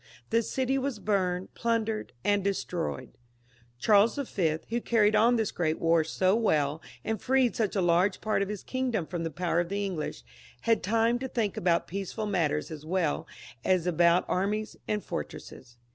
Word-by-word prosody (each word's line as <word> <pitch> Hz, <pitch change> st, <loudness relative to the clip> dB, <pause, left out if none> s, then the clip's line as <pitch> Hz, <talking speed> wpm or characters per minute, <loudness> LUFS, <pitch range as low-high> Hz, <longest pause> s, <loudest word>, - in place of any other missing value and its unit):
The 230 Hz, +1 st, +4 dB
city 265 Hz, +3 st, 0 dB
was 265 Hz, -3 st, -2 dB
burned, 190 Hz, -3 st, -1 dB
plundered, 225 Hz, -2 st, -1 dB
and 205 Hz, -1 st, +2 dB
destroyed. 175 Hz, -9 st, -3 dB, 0.6 s
Charles 210 Hz, -, +4 dB
V., 185 Hz, -, 0 dB
who 235 Hz, +2 st, -1 dB
carried 215 Hz, -2 st, +3 dB
on 230 Hz, +3 st, +5 dB
this 220 Hz, -3 st, 0 dB
great 160 Hz, -2 st, 0 dB
war 165 Hz, -1 st, +3 dB
so 185 Hz, +5 st, +1 dB
well, 155 Hz, -9 st, +1 dB, 0.2 s
and 220 Hz, -3 st, -2 dB
freed 260 Hz, -2 st, +2 dB
such 215 Hz, -3 st, 0 dB
a 195 Hz, -, +2 dB
large 175 Hz, +3 st, +3 dB
part 215 Hz, -2 st, 0 dB
of 200 Hz, -, -1 dB
his 210 Hz, -2 st, -5 dB
kingdom 250 Hz, -8 st, -1 dB
from 175 Hz, 0 st, -4 dB
the 165 Hz, -, -2 dB
power 170 Hz, +2 st, 0 dB
of 175 Hz, -1 st, -1 dB
the 200 Hz, +1 st, -1 dB
English, 175 Hz, -6 st, -4 dB, 0.4 s
had 230 Hz, -1 st, +2 dB
time 230 Hz, +4 st, +2 dB
to 265 Hz, -, -3 dB
think 225 Hz, -6 st, -1 dB
about 170 Hz, -1 st, +1 dB
peaceful 200 Hz, +3 st, -4 dB
matters 165 Hz, -7 st, 0 dB
as 155 Hz, -2 st, -7 dB
well 165 Hz, -2 st, -1 dB, 0.4 s
as 185 Hz, -3 st, +2 dB
about 175 Hz, 0 st, +3 dB
armies 210 Hz, +3 st, -1 dB
and 210 Hz, -1 st, -1 dB
fortresses. 120 Hz, -, -7 dB
200 Hz, 175 wpm, -28 LUFS, 170-225 Hz, 0.6 s, on